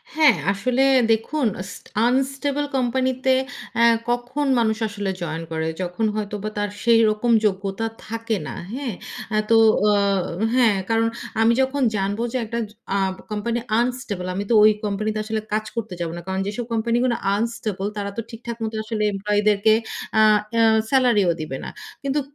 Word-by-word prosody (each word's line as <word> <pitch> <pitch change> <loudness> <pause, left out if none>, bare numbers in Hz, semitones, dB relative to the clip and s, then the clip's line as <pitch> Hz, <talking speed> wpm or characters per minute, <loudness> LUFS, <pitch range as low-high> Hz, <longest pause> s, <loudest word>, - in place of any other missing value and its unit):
হ্যাঁ, 310 -2 +6 0.2
আসলে 250 +6 0 0.3
দেখুন 230 +4 +1 0.2
স - - -7 0.4
আনস্টেবল 275 +3 0
কোম্পানিতে 260 +1 +1 0.5
আ - - +5 0.3
কখন 245 +4 -1
মানুষ 220 -2 +1
আসলে 205 -1 -4
জয়েন 165 -1 -3
করে, 160 0 -1
যখন 180 +5 -2
হয়তোবা 210 0 -3
তার 205 0 0
সেরকম 230 0 +3
যোগ্যতা 195 +2 -1 0.2
থাকে 225 0 -2
না। - - -6 0.2
হ্যাঁ? 260 -3 -3 0.4
আ - - +3
তো 230 - +5 0.3
অ - - +5 0.6
হ্যাঁ 230 -6 +4
কারণ 225 0 +2 0.3
আমি 225 +1 +5
যখন 265 +2 0
জানব 200 +1 -1
যে - - +1
একটা 235 +2 -3
জ - - -18 0.2
আ - - +3 0.3
কোম্পানি 230 +3 -1 0.2
আনস্টেবল 240 -6 -2
আমি 200 - -2
তো - - +3
ওই 215 - +8
কোম্পানিতে 215 +1 -1
আসলে 220 0 -2
কাজ 215 0 0
করতে 225 -5 -4
যাব 170 - -1
না। 175 - -6
কারণ 190 0 -2
যেসব 215 +4 -3
কোম্পানি 230 +1 +1
গুলো 250 -2 +2 0.2
আনস্টেবল, 215 -3 -2
তারা 200 -1 -2
তো - - 0
ঠিকঠাক 235 0 -7
মত 220 0 -3
আসলে 215 0 -2
এমপ্লয়িদেরকে 205 +1 +2 0.5
আ - - +7 0.7
সেলারি 250 -6 +4
ও - - +5
দিবে 145 -4 -4
না। - - -5 0.3
কিন্তু 275 +1 0
225 Hz, 160 wpm, -22 LUFS, 205-245 Hz, 0.7 s, ওই